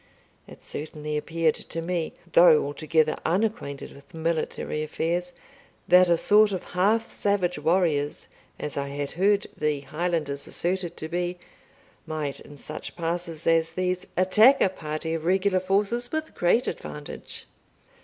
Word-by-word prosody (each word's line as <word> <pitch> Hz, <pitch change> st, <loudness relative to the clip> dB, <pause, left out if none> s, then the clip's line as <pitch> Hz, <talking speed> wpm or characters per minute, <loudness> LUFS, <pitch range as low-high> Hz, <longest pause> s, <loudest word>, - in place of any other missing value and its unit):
It -, -, -14 dB
certainly 150 Hz, 0 st, -5 dB
appeared 160 Hz, +1 st, +1 dB
to 165 Hz, -, -5 dB
me, 170 Hz, -1 st, -2 dB, 0.2 s
though 165 Hz, -4 st, +7 dB
altogether 155 Hz, +2 st, +1 dB
unacquainted 190 Hz, -, -1 dB
with 140 Hz, +3 st, -16 dB
military 160 Hz, -1 st, -2 dB
affairs, 170 Hz, +3 st, -2 dB, 0.6 s
that 180 Hz, 0 st, +6 dB
a 170 Hz, -, +4 dB
sort 210 Hz, +4 st, +5 dB
of 185 Hz, -2 st, -3 dB
half 210 Hz, +5 st, +2 dB
savage 185 Hz, -5 st, 0 dB
warriors, 155 Hz, -3 st, +1 dB, 0.3 s
as 150 Hz, -, -5 dB
I 140 Hz, 0 st, -1 dB
had 140 Hz, 0 st, -4 dB
heard 200 Hz, +3 st, +2 dB
the 150 Hz, -2 st, -1 dB
Highlanders 150 Hz, -2 st, -2 dB
asserted 175 Hz, -1 st, -2 dB
to 155 Hz, -, -4 dB
be, 175 Hz, +1 st, -2 dB, 0.7 s
might, 155 Hz, -3 st, -3 dB
in 145 Hz, -, -13 dB
such 155 Hz, +3 st, -7 dB
passes 170 Hz, -1 st, -3 dB
as 165 Hz, 0 st, +3 dB
these, 185 Hz, 0 st, -1 dB
attack 215 Hz, +9 st, +6 dB
a -, -, +4 dB
party 160 Hz, -2 st, -4 dB
of 165 Hz, -1 st, -3 dB
regular 190 Hz, +1 st, +2 dB
forces 205 Hz, +6 st, 0 dB
with 315 Hz, 0 st, -3 dB
great 180 Hz, +8 st, +2 dB
advantage. 150 Hz, -1 st, -7 dB
170 Hz, 140 wpm, -26 LUFS, 155-185 Hz, 0.7 s, though